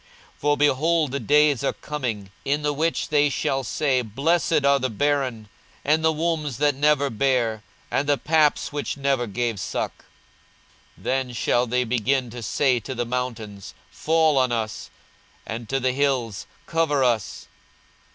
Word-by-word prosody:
42:023:029 - - -33
For, 145 0 +2
behold, 150 +1 +2
the 140 - -2
days 145 +3 +3
are - - +1
coming, 115 -10 -5
in 145 +2 0
the 150 0 +1
which 160 +3 -1
they 150 -1 +3
shall 135 0 -1
say, 130 +1 +1
Blessed 145 - +1
are 140 0 +4
the 130 0 -1
barren, 130 -2 -1 0.4
and 155 +2 +2
the 160 - +4
wombs 155 -4 -2
that 145 +1 +3
never 145 0 +2
bare, 115 -2 +1 0.3
and 145 +1 0
the 145 - +3
paps 155 -1 +2
which 145 -1 -3
never 135 -3 0
gave 115 0 -2
suck. - - -4 0.9
42:023:030 - - -19
Then 130 -1 -1
shall 120 +1 +1
they 125 +2 +1
begin 125 +1 0
to 120 +1 -7
say 125 +3 +1
to 130 +4 -7
the 120 0 -1
mountains, 110 -6 -5 0.2
Fall 160 -3 +2
on 130 -1 +2
us; 110 -2 -3 0.6
and 115 0 -6
to 135 - 0
the 130 0 +1
hills, 130 -6 -1 0.2
Cover 160 -4 +1
us. 120 -4 -1
135 Hz, 160 wpm, -24 LUFS, 120-145 Hz, 0.9 s, are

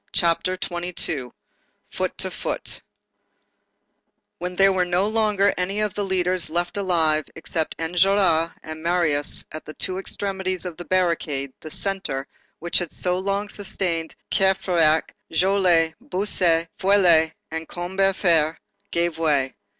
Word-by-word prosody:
CHAPTER 175 +2 +1
XXII—FOOT 175 -7 -5
TO - - -2
FOOT - - -4 1.6
When 180 +1 -4
there 195 +1 +5
were 185 -1 +2
no 180 +2 +1
longer 210 -2 +2
any 190 +3 -1
of 210 -2 0
the 205 - -2
leaders 185 -2 0
left 175 +2 -1
alive, 165 -6 +2
except 160 -1 -3
Enjolras 170 -1 +3
and 155 0 -7
Marius 165 -4 +1
at 155 - -6
the 155 - -10
two 185 0 -2
extremities 190 -2 -3
of 175 -2 -5
the 175 - -7
barricade, 165 -7 0
the 155 - -9
centre, 190 -7 -3 0.3
which 170 +1 +1
had 175 -3 -4
so 180 -1 0
long 200 +2 -1
sustained 180 -5 -3 0.2
Courfeyrac, 180 -5 +3 0.2
Joly, 175 -2 +3
Bossuet, 180 -4 +1
Feuilly 175 -5 +4 0.2
and 160 0 -4
Combeferre, 175 -3 +2 0.3
gave 170 -1 0
way. 145 -5 +2
175 Hz, 125 wpm, -23 LUFS, 160-190 Hz, 1.6 s, there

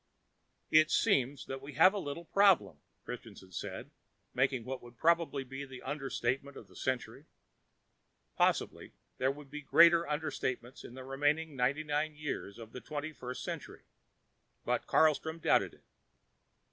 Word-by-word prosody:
"It 155 0 +6
seems 135 +1 +2
that 135 0 -6
we 140 +2 -9
have 175 +8 +6
a 205 - -2
little 170 +1 -5
problem," 195 0 +4 0.3
Christianson 110 -6 -9
said, - - -6 0.4
making 130 -2 +1
what 130 0 -5
would 120 0 -14
probably 160 -3 +2
be 135 +2 -7
the 130 -2 -10
understatement 135 -1 -2
of 105 - -11
the 90 - -20
century. 130 +3 -3 1.1
Possibly - - 0 0.3
there 130 - +2
would 140 0 -7
be 150 0 -6
greater 170 +3 +6
understatements 130 -5 -3
in 120 - -10
the 130 - -8
remaining 145 +3 0
ninety 135 +4 +1
nine 150 +1 -1
years 150 -9 -5
of 115 -1 -10
the 125 - -8
Twenty 155 +1 -5
first 125 -2 -6
Century, - - -6 0.8
but - - -1
Carlstrom 160 +1 +3
doubted 165 - +2
it. - - -27
140 Hz, 145 wpm, -32 LUFS, 130-155 Hz, 1.1 s, It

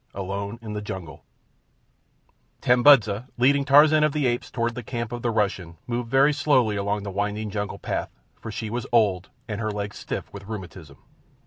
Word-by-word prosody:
Alone 100 +3 -4
in 105 -2 -6
the 105 - -4
Jungle 95 -6 -7 1.4
Tambudza, 125 -3 +5
leading 140 +3 +3
Tarzan 150 +2 +6
of 150 -2 +2
the 150 -3 0
Apes 120 -1 -1
toward 115 -1 -1
the 125 - -6
camp 120 0 -5
of 120 0 -5
the 120 - 0
Russian, 100 -6 -1
moved 120 -1 -3
very 135 +4 +4
slowly 130 -7 +2
along 100 0 -1
the 100 - -5
winding 105 +2 -2
jungle 100 -1 -3
path, - - -3 0.3
for 110 - -7
she 110 0 -5
was 120 0 -3
old 100 -6 +2 0.2
and 105 0 -4
her 110 - -1
legs 105 0 -5
stiff - - -6
with 100 0 -10
rheumatism. 90 -9 -8
110 Hz, 180 wpm, -24 LUFS, 100-125 Hz, 1.4 s, Tarzan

